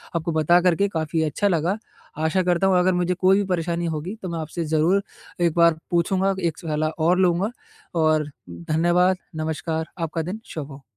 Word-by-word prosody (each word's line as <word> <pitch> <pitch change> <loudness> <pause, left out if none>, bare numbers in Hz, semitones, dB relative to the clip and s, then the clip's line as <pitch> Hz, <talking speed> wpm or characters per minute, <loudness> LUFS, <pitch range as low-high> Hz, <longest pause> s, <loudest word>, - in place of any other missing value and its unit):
आपको 170 0 -1
बता 160 +2 +4
कर 180 -2 +3
के 200 +4 +2
काफ़ी 160 -2 -2
अच्छा 160 +7 0
लगा। 175 +2 +1 0.5
आशा 175 +4 +2
करता 180 +1 +2
हूँ 190 -1 +4
अगर 185 +1 +3
मुझे 180 0 +1
कोई 185 +2 +3
भी 205 - +1
परेशानी 170 -1 -1
होगी, 165 +5 -3
तो 185 - -5
मैं 170 -1 -3
आपसे 160 +2 -4
ज़रूर 160 +6 +2 0.4
एक 170 -2 +3
बार 170 -2 +5
पूछूँगा, 190 +3 +2
एक 170 -4 -1
सलाह 155 -1 -1 0.2
और 180 +2 +3
लूँगा 185 +3 +2 0.5
और 155 -1 +2 0.2
धन्यवाद, 175 - +1 0.2
नमस्कार, 160 +1 -2
आपका 165 0 -2
दिन 185 +7 -5
शुभ 150 -2 -6
हो। 135 0 -11
170 Hz, 185 wpm, -23 LUFS, 160-180 Hz, 0.5 s, बार